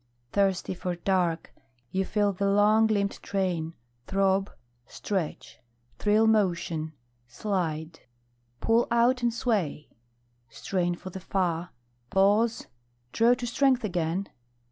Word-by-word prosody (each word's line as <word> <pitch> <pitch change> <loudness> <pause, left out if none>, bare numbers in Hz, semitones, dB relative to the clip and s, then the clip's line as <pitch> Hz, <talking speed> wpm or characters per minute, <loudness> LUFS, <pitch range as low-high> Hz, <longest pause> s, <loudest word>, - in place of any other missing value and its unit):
Thirsty 195 -2 +1
for 180 0 -3
dark, 175 -2 0 0.4
you 190 0 0
feel 205 0 +1
the 200 +2 0
long 210 +2 +4
limbed 200 -2 -1
train 175 -5 -2 0.3
Throb, 195 0 +2 0.4
stretch, 190 -7 -4 0.4
thrill 215 +1 +3
motion, 175 -7 +1 0.3
slide, 165 - -3 0.6
pull 230 +1 +2
out 240 +2 +3
and 240 -1 +2
sway, 210 - -1 0.6
Strain 175 +5 -1
for 185 +2 -9
the 190 - -6
far, 180 -2 -1 0.4
pause, 205 - +2 0.5
draw 235 +2 +4
to 245 - -5
strength 255 +1 +2
again. 175 -1 -1
195 Hz, 110 wpm, -27 LUFS, 175-215 Hz, 0.6 s, long